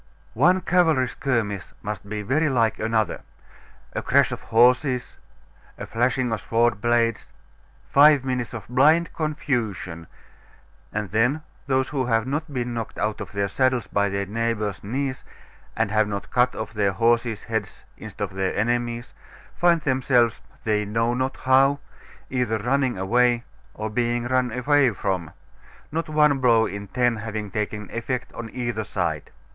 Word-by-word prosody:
One 180 +10 +4
cavalry 165 -8 +3
skirmish 115 -8 -2
must 100 -1 -5
be 105 0 -3
very 150 +9 +1
like 115 -5 +1
another. 110 -3 0 0.7
A - - -2
crash - - +3
of - - -5
horses, 125 +2 +2 0.6
a - - -6
flashing 125 +1 0
of 110 - -3
sword 115 -2 +1
blades, 115 -1 +1 0.6
five 145 -1 +6
minutes 125 -2 -2
of 110 - -8
blind 150 +7 +3
confusion, 115 - -3 0.8
and 105 -2 -3
then 120 +9 +1 0.2
those 130 -1 +1
who 135 -4 -1
have 115 -2 +2
not 150 +4 -3
been 125 -3 -3
knocked 115 -2 -5
out 105 0 -2
of - - -7
their 100 0 0
saddles 130 +3 +1
by 100 0 0
their 100 0 -2
neighbours' 105 -2 -2
knees, 130 +5 -3 0.5
and 110 -2 +1
have 110 -1 +3
not 100 -1 -5
cut 125 0 +2
off - - -5
their 105 -2 +1
own 95 - -5
horses' 115 -1 +1
heads 110 -3 -4
instead - - -7
of 100 -1 -4
their 95 -1 -1
enemies', 120 +2 -1 0.4
find 170 -2 +3
themselves, 130 -4 +2 0.2
they 105 -1 +1
know 115 +3 0
not 130 +2 -2
how, 135 +2 +4 0.5
either 125 -4 0
running 125 +2 0
away 120 +5 +2 0.3
or 110 - -3
being 120 +2 0
run 125 0 +1
away 135 +3 +3
from 95 -6 -2 0.6
not 165 +1 -2
one 150 -2 +3
blow 115 -3 +4
in 100 -1 -6
ten 120 +1 +1
having 105 -1 -5
taken 105 0 -3
effect 120 +2 -3
on 115 -1 -7
either 120 -2 -3
side. 100 - -3
120 Hz, 155 wpm, -24 LUFS, 105-130 Hz, 0.8 s, five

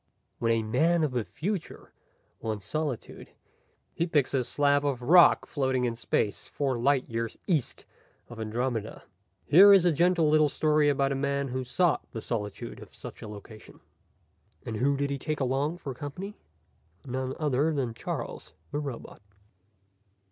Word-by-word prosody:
When 115 -1 +1
a 115 -1 +1
man 160 +10 +2
of 150 - 0
the 125 -2 -1
future 175 - -5 0.5
wants 110 -3 -4
solitude 150 -1 -4 0.7
he 170 - -1
picks 145 -6 +1
a 130 -2 +2
slab 145 +3 +2
of 135 -4 -1
rock 170 +6 +6
floating 130 -3 0
in 120 - 0
space 110 -2 -1
four 135 -4 -2
light 135 +2 +2
years 115 0 -4
east 155 -9 -1 0.4
of 120 -1 -10
Andromeda. 115 0 -3 0.4
Here 195 +6 +8
is 195 -3 +6
a 175 - +5
gentle 170 +1 +3
little 155 0 +4
story 150 0 +2
about 140 -1 +1
a - - 0
man 140 0 -1
who 130 +1 -3
sought 165 +6 +1
the 115 - -4
solitude 105 -3 -4
of - - -13
such - - -10
a - - -7
location. 105 +1 -12 0.9
And 110 - -4
who 140 +4 +2
did 140 0 -1
he 140 - -2
take 155 +2 -3
along 140 +5 0
for 140 -6 -6
company? 160 - -7 0.7
None 130 0 -3
other 150 +1 +1
than 135 -6 -2
Charles - - -6 0.2
the 145 - -2
Robot. 135 -8 -7
140 Hz, 160 wpm, -28 LUFS, 120-155 Hz, 0.9 s, Here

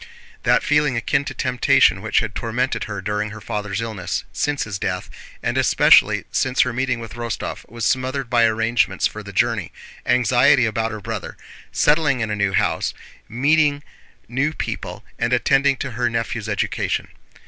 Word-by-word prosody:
That - - +3
feeling 150 -4 +2
akin 140 +4 0
to - - -5
temptation 125 -7 +3
which 110 - +1
had 110 -2 -4
tormented 120 +4 -2
her 100 -3 -6
during 105 +1 -2
her 110 +1 -9
father's 105 +1 -3
illness, 110 -6 -3
since 145 -1 -1
his 100 -3 -5
death, - - -3 0.3
and - - 0
especially - - +5
since 130 0 +1
her 125 - +1
meeting 125 -1 -1
with 115 -2 -8
Rostóv 120 -1 -5
was 115 0 -4
smothered 130 0 0
by 120 -1 +3
arrangements 115 +1 +1
for - - -2
the - - -9
journey, - - 0 0.4
anxiety 125 +1 +4
about 110 0 -1
her 110 -1 -7
brother, 110 -2 -6 0.3
settling 150 -3 +2
in 110 -2 -2
a - - 0
new 100 -1 0
house, - - 0 0.3
meeting 145 +4 +2 0.4
new 140 +6 0
people, - - -5
and 115 +1 0
attending 135 +2 +3
to 140 - -4
her 120 0 0
nephew's 115 -2 -3
education. - - -1
120 Hz, 165 wpm, -21 LUFS, 110-135 Hz, 0.4 s, especially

